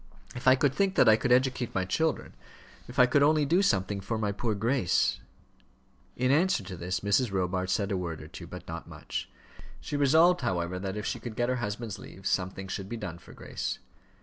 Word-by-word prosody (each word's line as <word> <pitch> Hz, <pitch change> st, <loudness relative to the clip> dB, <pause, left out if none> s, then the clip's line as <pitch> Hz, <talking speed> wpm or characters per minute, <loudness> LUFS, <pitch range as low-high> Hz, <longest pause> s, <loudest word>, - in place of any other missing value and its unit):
If 125 Hz, +1 st, -5 dB
I 130 Hz, -, +8 dB
could 135 Hz, 0 st, +2 dB
think 195 Hz, +3 st, +1 dB
that -, -, +5 dB
I 110 Hz, -, +8 dB
could 125 Hz, +3 st, -1 dB
educate 125 Hz, -1 st, +2 dB
my 95 Hz, -1 st, +1 dB
children; 160 Hz, +11 st, -1 dB, 0.5 s
if 125 Hz, -, -11 dB
I 125 Hz, -, +8 dB
could 135 Hz, +3 st, +2 dB
only 150 Hz, +1 st, +4 dB
do 170 Hz, +7 st, +3 dB
something 100 Hz, -, +1 dB
for 105 Hz, +4 st, -3 dB
my 105 Hz, -2 st, 0 dB
poor 110 Hz, +2 st, -2 dB
Grace 115 Hz, -2 st, +1 dB, 0.5 s
" 65 Hz, 0 st, -36 dB
In 130 Hz, -, +4 dB
answer 160 Hz, -, +3 dB
to 95 Hz, 0 st, -7 dB
this 90 Hz, +2 st, -3 dB
Mrs. 100 Hz, +3 st, +2 dB
Robarts 95 Hz, 0 st, -1 dB
said 100 Hz, -1 st, -1 dB
a 95 Hz, -, 0 dB
word 85 Hz, -3 st, -4 dB
or -, -, -10 dB
two, -, -, -10 dB
but -, -, -9 dB
not -, -, -6 dB
much. -, -, -6 dB, 0.5 s
She -, -, -5 dB
resolved, 160 Hz, +5 st, +5 dB
however, 90 Hz, -6 st, -1 dB
that 95 Hz, +1 st, -4 dB
if 105 Hz, -, -4 dB
she -, -, -2 dB
could 120 Hz, -3 st, -7 dB
get 120 Hz, +2 st, 0 dB
her 130 Hz, -, 0 dB
husband's 105 Hz, -2 st, -4 dB
leave, 95 Hz, -, -12 dB
something 95 Hz, 0 st, -1 dB
should 95 Hz, +1 st, -5 dB
be 120 Hz, -, -4 dB
done 90 Hz, -6 st, -6 dB
for -, -, -15 dB
Grace. -, -, -4 dB
110 Hz, 220 wpm, -29 LUFS, 95-130 Hz, 0.5 s, I